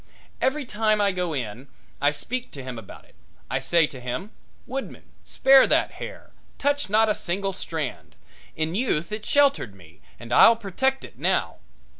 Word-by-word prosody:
Every 280 +2 0
time 215 -1 +1
I 200 -1 +3
go 180 -3 -2
in 125 +1 -5 0.3
I 145 - +5
speak 245 - -4
to 135 - -8
him 130 -3 -6
about 105 - -13
it. - - -25 0.4
I 130 - +1
say 165 +5 +3
to 135 -3 -9
him: 125 - -5 0.3
"Woodman, 270 +2 -7
spare 270 0 +5
that - - +2
hair, - - -9 0.3
touch 285 -4 0
not 220 +2 +4
a 210 - +3
single 195 +2 -2
strand; 160 -7 -5 0.4
in 160 +1 -1
youth 185 -7 -1
it 215 0 -5
sheltered 280 - +2
me 85 -1 -18 0.2
and 120 0 -6
I'll 230 - +8
protect 265 +6 -1
it - - -12
now." - - 0
190 Hz, 170 wpm, -25 LUFS, -, 0.4 s, I'll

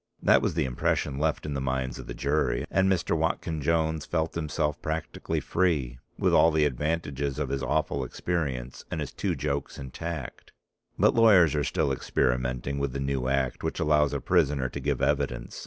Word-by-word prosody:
That - - +5
was - - -1
the - - +1
impression 65 +2 -1
left 80 0 0
in 75 - -3
the 70 - -2
minds 65 -1 -2
of - - -9
the - - -6
jury. 70 -4 0
And 95 0 +3
Mr. 85 -2 +1
Watkyn 80 0 -1
Jones 80 0 +1
felt 80 -1 -1
himself 75 -2 -2
practically 80 0 -3
free, 75 -10 0 0.2
with - - +2
all 80 - +6
the 80 -2 +2
advantages 70 0 -2
of 75 -3 -2
his 70 0 -2
awful 65 +1 0
experience, 65 -3 -3
and - - -3
his - - -4
two - - -1
jokes 70 -1 -3
intact. 70 +1 -6 0.4
But - - +4
lawyers 100 -9 +6
are 75 -1 +1
still 70 0 0
experimenting 65 +1 -1
with 70 -2 -2
the 70 - -3
new 70 -2 -1
act 65 -1 0
which - - -2
allows 75 -1 +3
a - - -2
prisoner 75 -7 +1
to 70 - -6
give 70 -1 -1
evidence. 65 -4 -1
70 Hz, 185 wpm, -27 LUFS, 65-80 Hz, 0.4 s, all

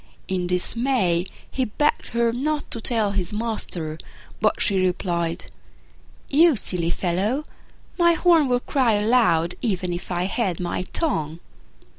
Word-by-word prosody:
In 180 -2 -1
dismay, 180 -1 +1 0.2
he 260 - 0
begged 295 +7 0
her 235 0 +1
not 295 +4 -2
to 230 - -3
tell 220 -3 +1
his 190 -3 -1
master: 185 -8 -3 0.4
but - - +2
she 195 -3 +2
replied, 175 -2 -1 0.8
"You 320 +1 +5
silly 180 -5 0
fellow, 195 - -1 0.6
my 340 0 +5
horn 330 -3 +4
would 245 -1 0
cry 255 -6 +2
aloud 205 -6 +3
even 185 -6 -1
if 175 - -6
I 175 0 0
held 190 -2 -1
my 180 +1 -2
tongue." 160 - -2
205 Hz, 135 wpm, -23 LUFS, 175-250 Hz, 0.8 s, You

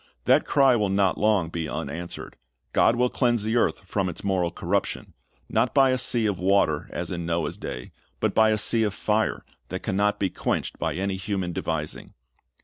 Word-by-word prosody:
That - - +4
cry 135 -3 +5
will 105 -4 +1
not 95 -1 +2
long 105 -5 +2
be 80 -2 -4
unanswered. 80 +3 -6 0.4
God 115 - +4
will 125 +1 +1
cleanse 120 -4 +1
the 110 +2 -1
earth 120 - +1
from 95 0 -1
its 85 - -7
moral 95 -3 +1
corruption, 85 - -2 0.3
not 115 +4 0
by 135 -2 +5
a 130 - +2
sea 120 -2 +1
of 100 -5 0
water 90 -4 +2
as 85 +1 -4
in 85 -1 -3
Noah's 85 -1 -1
day, 60 - -7 0.3
but - - 0
by 110 0 +5
a 110 - +2
sea 115 +2 +1
of 105 -2 0
fire 110 +1 0 0.2
that - - -5
can 95 - -2
not 105 +1 +2
be 95 -2 -1
quenched - - -2
by - - -1
any 95 +1 -2
human 95 -2 -3
devising. 75 -2 -4
100 Hz, 195 wpm, -25 LUFS, 85-110 Hz, 0.4 s, cry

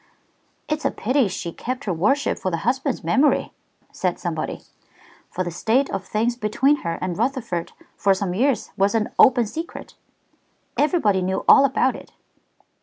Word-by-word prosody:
"It's 305 0 -2
a - - +2
pity 255 +1 +1
she 175 -2 -5
kept 255 +3 -5
her 190 - -1
worship 270 - +1
for 185 - -1
the 165 -2 -4
husband's 265 +2 -1
memory," 285 +3 +2 0.4
said - - -2
somebody. - - -4 0.7
"For 185 - -3
the 175 - -4
state 230 +10 +1
of 195 -1 -3
things 230 +3 0
between 245 +6 +2
her 170 -7 -4
and 180 -1 -3
Rutherford 230 - -2 0.3
for 195 -1 +3
some 190 -2 -2
years 260 +7 0
was 200 +3 +1
an 215 -1 0
open 245 -2 +6
secret. 325 +10 -7 0.8
Everybody 285 - +2
knew 190 +1 -2
all 275 - +8
about 270 - +1
it." - - -12
225 Hz, 160 wpm, -22 LUFS, 190-270 Hz, 0.8 s, all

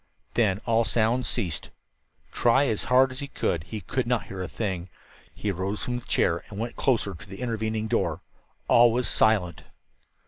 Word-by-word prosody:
Then 105 -4 +2
all 115 -1 +3
sound 115 +2 +1
ceased. 85 -6 -2 0.6
Try 125 +4 +3
as 110 -6 -1
hard 130 +1 +4
as 130 - -7
he 140 -1 -5
would, 80 -2 0
he 110 -2 -6
could 130 +3 -2
not 120 -2 +1
hear 95 -1 -7
a 90 - -3
thing. 95 -5 -3 0.5
He 105 - -2
rose 95 +3 -3
from 125 -1 -2
the 120 - -16
chair 85 0 +1
and 100 - -9
went 115 +2 -4
closer 115 -7 +1
to 100 +3 -12
the 95 - -9
intervening 110 -2 -2
door. 85 -7 -1 0.4
All 120 0 +6
was 125 +2 0
silent! 100 -6 +2
110 Hz, 180 wpm, -26 LUFS, 95-120 Hz, 0.6 s, All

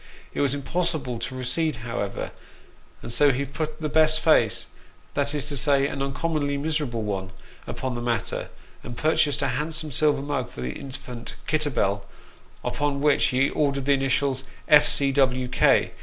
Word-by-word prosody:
It - - -1
was 140 -1 +1
impossible 145 -4 -1
to 130 - -4
recede, 135 +5 0
however, 100 -4 -3 0.7
and - - -6
so 145 +4 +4
he 135 +2 -1
put 155 +3 -5
the 155 - -1
best 155 +1 +4
face 155 -9 +3 0.5
that 140 +1 0
is 145 -1 0
to 145 -1 0
say, 140 0 +3
an 140 -1 -3
uncommonly 145 +1 -1
miserable 145 -6 -1
one 95 -2 -3 0.4
upon 130 -1 -4
the 120 - -4
matter; 115 -4 -2 0.3
and 120 0 -8
purchased 150 -1 +2
a 140 - +1
handsome 155 0 -3
silver 145 0 +2
mug 140 -4 -2
for - - -9
the 65 0 -3
infant 130 -3 -7
Kitter 155 -1 +1
bell, 100 -6 0 0.6
upon 145 -1 -1
which 150 -1 +3
he 130 +2 +2
ordered 140 -3 0
the 140 - +4
initials 135 0 0 0.2
"F. 150 -1 +7
C. 140 -1 +4
W. 130 -2 +2
K. - - +3
140 Hz, 170 wpm, -25 LUFS, 125-150 Hz, 0.7 s, F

